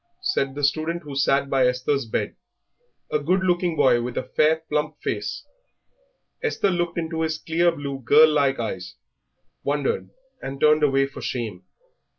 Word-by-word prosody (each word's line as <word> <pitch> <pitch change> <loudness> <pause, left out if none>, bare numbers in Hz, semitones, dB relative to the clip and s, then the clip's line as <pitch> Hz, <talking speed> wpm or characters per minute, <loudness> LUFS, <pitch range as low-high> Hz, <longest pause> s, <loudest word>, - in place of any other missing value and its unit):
said 135 - 0
the 145 - -5
student 160 +4 0
who 145 -2 -8
sat 140 0 +2
by 135 -2 +3
Esther's 125 +1 0
bed, - - -2 0.8
a 150 - +2
good 180 +6 +1
looking 175 -2 +1
boy 120 -5 +4
with 120 0 -5
a - - 0
fair, 160 +1 +2
plump 150 +1 -2
face. - - -3 1.0
Esther 445 - 0
looked 175 -1 -1
into 160 -1 -2
his 160 -1 -1
clear 170 +2 +1
blue, 140 -4 -5
girl 155 +6 +7
like 140 -2 +2
eyes, - - -4 0.7
wondered, 465 +1 -1 0.3
and 135 0 -6
turned 150 +1 +4
away 135 -2 +3
for 135 - -9
shame. 110 -7 -4
150 Hz, 160 wpm, -24 LUFS, 135-165 Hz, 1.0 s, girl